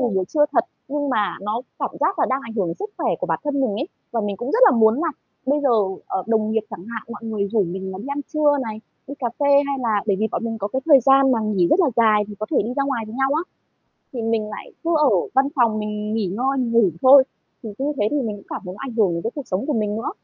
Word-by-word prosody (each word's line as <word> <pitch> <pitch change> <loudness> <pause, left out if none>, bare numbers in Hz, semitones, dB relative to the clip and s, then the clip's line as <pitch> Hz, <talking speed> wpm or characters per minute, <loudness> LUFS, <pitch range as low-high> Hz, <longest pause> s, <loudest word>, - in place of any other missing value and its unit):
nghỉ 240 -6 0
buổi 185 - +1
trưa 295 +8 +2
thật. - - +3 0.2
Nhưng 285 0 -2
mà 210 -4 0
nó 215 +4 -3 0.2
cảm - - -2
giác 390 - +1
là - - +3
đang 265 +1 +1
ảnh 230 -3 -8
hưởng 195 -6 0
đến 165 - -3
sức 415 +1 -5
khỏe - - 0
của - - -2
bản - - -1
thân 290 -1 -1
mình 260 - +1
ấy, 285 - -3 0.2
và 230 - -1
mình 205 -1 -3
cũng 245 +7 -4
rất 460 - +2
là - - +7
muốn 220 -1 +5
là 325 +6 0 0.4
bây 290 +2 +2
giờ, 275 - +3 0.4
ờ, 190 - -2
đồng 220 -1 +1
nghiệp 225 0 +1
chẳng 190 -3 -8
hạn, 220 - -4
mọi 235 - -9
người 210 -3 -2
rủ 220 -3 +3
mình 190 +2 -5
là 185 - -7
đi 210 - -8
ăn 280 +1 -2
trưa 295 -1 +3
này, 220 -2 -6 0.3
đi 280 - -7
cà 245 -3 -1
phê 285 - +1 0.2
hay 275 -1 -2
là 215 -3 +1
bởi 200 - +2
vì 220 - +2
bọn - - -2
mình 225 -1 -3
có 200 0 -3
cái 265 +4 -3
thời 285 -4 +7
gian 270 +1 +5
mà 235 - +2
nghỉ 200 -5 +2
rất 370 - +4
là 320 -7 +3
dài 215 -2 +4
thì 205 - -7
có 215 - -3
thể - - +2
đi 235 - -3
ra 275 - +2
ngoài 265 -5 -2
với 215 - -9
nhau 270 +1 +1
á, 320 - +1 0.7
thì 240 - -4
mình 225 -1 0
lại 210 - -9
cứ 335 - 0
ở 300 -2 +4 0.2
văn 270 +1 +4
phòng 230 -4 +3
mình 210 0 -3
nghỉ 220 -4 0
ngơi, 255 +9 -1
mình 245 -3 -1
ngủ 230 -6 +4
thôi. 265 +1 +8 0.4
Thì 225 - -6
cứ 270 - -2 0.2
thế 205 - +3
thì 295 - 0
mình 215 -4 -3
cũng 200 - -15
cảm - - -5
thấy 180 0 -6
nó - - -15
ảnh 245 - -7
hưởng 200 -6 +3
đến 170 - -3
cái 230 - -2
cuộc 285 -3 -6
sống 190 +7 -2
của 300 - 0
mình 210 -3 -1
nữa. 230 - -3
230 Hz, 300 wpm, -22 LUFS, 210-270 Hz, 0.7 s, thôi